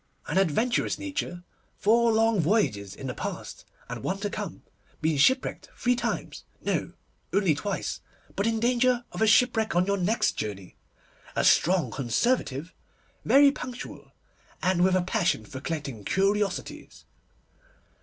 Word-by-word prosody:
'An - - +1
adventurous 195 +7 +1
nature; 285 - -4 0.3
four 230 +3 +4
long 225 -1 +3
voyages 150 - +1
in 135 - -9
the 125 - -3
past, - - -6 0.2
and - - -6
one 190 - -2
to 205 +1 -3
come. 210 -2 -6 0.4
Been 155 -1 +1
ship 260 - +5
wrecked - - -7
three 245 0 +2
times. 240 - -3 0.2
No, - - -2 0.4
only 195 -5 +3
twice, 190 +7 -3 0.3
but 200 - 0
in 225 -1 +1
danger 245 +1 +2
of - - -6
a 220 - +4
shipwreck 225 0 +3
your 200 +1 0
next 200 +5 +1
journey. 100 -3 -6 0.6
A - - +1
strong 170 -8 +4
Conservative, 140 - -1 0.5
very 280 +1 +6
punctual, 250 -2 -8 0.5
and 180 -1 +3
with 185 0 +4
a 185 - +2
passion 180 - 0
for 130 -3 -8
collecting 140 -9 -4
curiosities. 195 - -1
195 Hz, 140 wpm, -27 LUFS, 160-230 Hz, 0.6 s, very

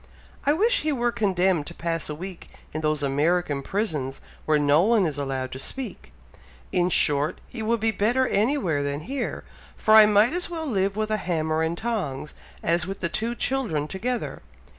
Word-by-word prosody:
I 290 - +6
wish 460 +9 +3
he 310 - 0
were 240 -3 +1
condemned 190 -8 +1
to - - -7
pass 165 -2 -2
a 150 - -3
week 180 +2 -8 0.3
in 155 - -3
those 155 -1 0
American 145 +1 +1
prisons 150 -8 -2 0.3
where 155 -1 +4
no 145 +1 +4
one 215 0 +3
is 150 -3 -2
allowed 135 -2 -3
to 130 - -6
speak. 265 - -5 0.6
In 180 -1 +2
short, 145 -3 +2
he 235 - -7
would 230 +1 +1
be 225 +1 +2
better 240 +5 +2
anywhere 205 - +1
than 140 +1 -2
here, 255 - -4 0.3
for 215 - +3
I 215 -1 +9
might 210 +5 +4
as 355 0 -1
well 330 -2 -4
live 195 -7 0
with 215 0 -1
a 215 - +2
hammer 160 -5 -1
and 160 +1 -1
tongs, 175 - -3 0.3
as 170 +1 +2
with 195 +1 -5
the 170 - 0
two 230 +6 -2
children 230 - -1
together. 235 +8 -3
185 Hz, 185 wpm, -25 LUFS, 155-230 Hz, 0.6 s, I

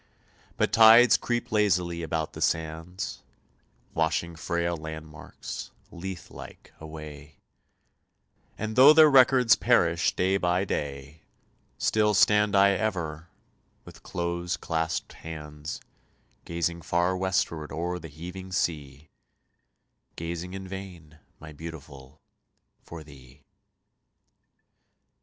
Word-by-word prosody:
But - - 0
tides 115 +1 +8
creep 120 0 -2
lazily 90 -5 +1
about 80 -1 -3
the - - -9
sands, 80 +3 -3 0.7
Washing 80 +1 -1
frail 85 +1 -2
landmarks, 80 -1 -8 0.2
Lethe 90 0 -8
like, - - -12
away, 75 -2 -10 1.2
And 110 0 -4
though 135 +4 +9
their 155 -1 +7
records 130 -2 +6
perish 85 -9 +2
day 95 +2 +1
by 90 +1 0
day, 70 -2 -5 0.6
Still 105 -1 +2
stand 105 0 +4
I 100 0 +6
ever, 85 -6 -3 0.6
with - - -14
close 85 0 -3
claspèd 80 0 -3
hands, 75 -2 -7 0.7
Gazing 85 0 -2
far 85 +2 0
westward 90 -4 -1
o'er 90 +3 -3
the 80 - -9
heaving 90 +5 -9
sea, 75 -5 -3 1.1
Gazing 85 +2 -5
in 95 -1 -7
vain, 90 -5 -10 0.2
my 80 0 -11
Beautiful, 75 -3 -11 0.6
for 85 -2 -10
thee. 70 -2 -16
85 Hz, 100 wpm, -27 LUFS, 80-95 Hz, 1.2 s, though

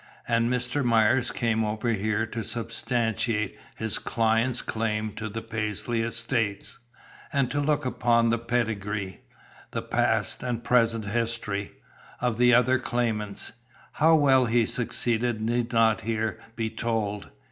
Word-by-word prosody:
"And 115 0 +2
Mr. 125 +3 0
Myers 120 +1 +3
came 115 -1 0
over 110 +2 -1
here 110 0 0
to 115 0 -5
substantiate 115 -2 -1 0.2
his 110 -1 -1
client's 115 +2 +1
claim 110 -1 -2
to 110 0 -5
the 115 +2 -5
Paisley 115 +1 -2
estates, 115 -2 -1 0.5
and 140 -3 +1
to 145 - 0
look 145 -1 +1
up 130 - -4 0.3
the 115 - +1
pedigree, 110 -5 -2 0.5
the - - -4
past - - 0
and 120 -2 -3
present 115 -3 +2
history, 110 -2 -2 0.5
of 120 -2 -1
the 125 0 +6
other 125 +1 +4
claimants. 115 -5 -2 0.4
How 160 +1 +4
well 135 -4 +4
he 115 0 +3
succeeded 120 -1 0
need 120 +2 -1
not 115 -2 +3
here 110 -1 -2 0.2
be 110 -1 -2
told. 105 -3 -2
115 Hz, 135 wpm, -26 LUFS, 110-120 Hz, 0.5 s, the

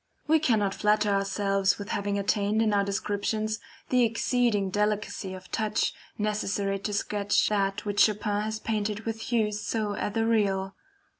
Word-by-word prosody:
We 315 +1 +4
cannot 220 -9 +2
flatter 210 0 +2
ourselves 195 0 +1
with 205 - -7
having 200 0 -1
attained 205 +1 +1
in 215 -2 +2
our 200 -1 +3
descriptions 210 +2 -1 0.3
the 250 -1 +3
exceeding 230 -3 +1
delicacy 210 -2 -1
of 185 0 -12
touch, 215 -1 0 0.2
necessary 205 -2 -1
to 210 - -3
sketch 205 0 +1
that 195 -1 0
which 205 0 -1
Chopin 210 -1 +2
has 215 +1 -2
painted 210 -1 -2
with 225 0 -4
hues 215 -3 0
so 215 -2 -1
ethereal. 205 -3 0
210 Hz, 145 wpm, -27 LUFS, 200-215 Hz, 0.3 s, We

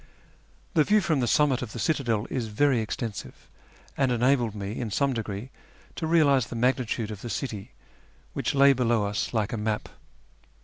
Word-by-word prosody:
The 160 -5 +5
view 210 +6 +4
from 160 -6 +1
the 120 - +1
summit 140 0 +3
of 120 -4 -6
the - - -6
citadel 120 - 0
is 125 -4 -2
very 130 +4 +2
extensive, 110 -1 -5 0.5
and 135 -2 +1
enabled 120 -2 +2
me 100 -1 -4
in 120 - -3
some 135 +7 +1
degree 110 +1 -5 0.4
to 160 - -3
realise 145 -6 +4
the - - -7
magnitude 120 -2 0
of 100 -2 -7
the 120 - -6
city, 105 -2 -4 0.6
which - - -1
lay 140 0 +7
below 120 -4 +1
us 100 0 -2
like 110 -3 -1
a - - -1
map. 105 0 -2
120 Hz, 175 wpm, -27 LUFS, 110-140 Hz, 0.6 s, lay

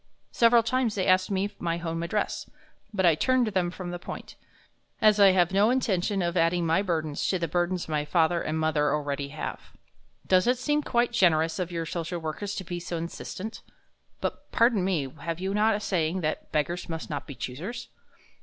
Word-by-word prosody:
Several 235 0 +5
times 245 -1 0
they 190 - 0
asked 185 0 +3
me 200 +1 -1
my 170 -1 -1
home 165 -1 -3
address, 185 +5 -2 0.4
but 190 -3 +1
I 170 - +6
turned 255 - +2
them 185 -4 0
from 180 0 -6
the 175 - -5
point, - - -8 0.6
as 215 -1 +5
I 200 -1 +8
have 180 -1 +3
no 200 +3 +4
intention 200 -6 +1
of 170 0 -1
adding 170 0 +2
my 165 +4 +3
burdens 160 -6 -1
to 190 - +1
the 170 -1 -2
burdens 175 +2 -1
my 150 -2 0
father 165 +2 +2
and 155 - -2
mother 155 -2 +1
already 145 -1 -3
have.... 155 +2 -5 0.7
Does 185 +3 +3
it 250 +1 +3
seem 295 +4 +1
quite 240 -4 +1
generous 165 -6 +3
of 180 -1 -2
your 165 -1 -3
social 170 +1 -3
workers 170 +6 -4
to 195 - -4
be 175 0 -5
so 170 0 -4
insistent?... 185 +5 -6 0.6
But, - - -4
pardon 230 -5 +3
me, 175 -7 0
have 165 +2 -4
you 190 +1 -2
not 215 +1 +3
a - - -2
saying 180 -3 -1
that 155 -1 -3
'Beggars 170 +4 -1
must 160 -1 -5
not 145 -1 -4
be 140 - -7
choosers?'" 185 - -6
175 Hz, 195 wpm, -27 LUFS, 165-205 Hz, 0.7 s, I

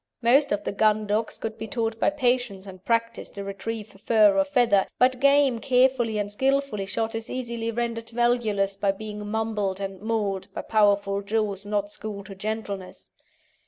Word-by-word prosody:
Most 275 +5 +4
of 205 0 0
the - - -2
gun 215 +1 +2
dogs 210 +2 -1
could 225 0 -5
be 220 - -5
taught 225 -3 -2
by - - +3
patience 245 -8 0
and 185 -2 -11
practice 230 +1 -1
to 200 - -7
retrieve 200 +1 -6
fur 215 -3 +5
or 290 - +4
feather, 245 -9 +3
but 255 0 +3
game 280 -3 +4
carefully 250 -3 +2
and 205 -1 -2
skilfully 265 -3 0
shot 225 +3 -2
is 225 0 -4
easily 235 -2 -3
rendered 230 0 -3
valueless 230 -5 +1
by 195 0 +1
being 210 0 -7
mumbled 210 -3 -1
and 195 -1 -5
mauled 210 -4 -2
by - - -4
powerful 200 -2 +2
jaws 205 -1 -2
not 205 -1 -1
schooled 205 -2 -6
to 195 - -9
gentleness. 200 -1 -5
220 Hz, 170 wpm, -25 LUFS, 200-235 Hz, -, fur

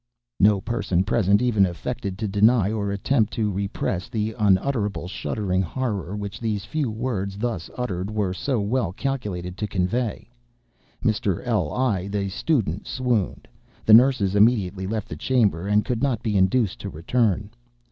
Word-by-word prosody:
No 105 0 +5
person 95 -6 0
present 100 +1 +2
even 110 -5 +3
affected 95 +2 -3
to 110 - -2
deny, 105 +1 +3
or 100 -2 -2
attempted 105 +3 +1
to 105 -2 0
repress, 95 -1 -2
the 110 0 -2
unutterable, 105 -1 +1
shuddering 95 0 -1
horror 100 0 -3
which 100 -1 -5
these 105 -3 -2
few 150 -5 -1
words, 105 -4 -3
thus 110 -6 -3
uttered, 100 -6 -3
were 105 -4 -1
so 125 +6 -1
well 105 -3 0
calculated 95 -9 -3
to 105 - -2
convey. 100 +5 -1 0.8
Mr. 105 -3 0
L—l 110 -4 0
(the 100 -1 -1
student) 105 - -1
swooned. 125 -6 -1 0.4
The 110 - +6
nurses 115 -5 +6
immediately 100 -4 +3
left 110 0 -3
the 80 - -6
chamber, 100 -2 +1
and 105 +1 +2
could 120 -3 -2
not 130 -5 0
be 110 -3 -1
induced 95 +3 +2
to 100 - -5
return. 105 +4 0
105 Hz, 150 wpm, -24 LUFS, 95-120 Hz, 0.8 s, The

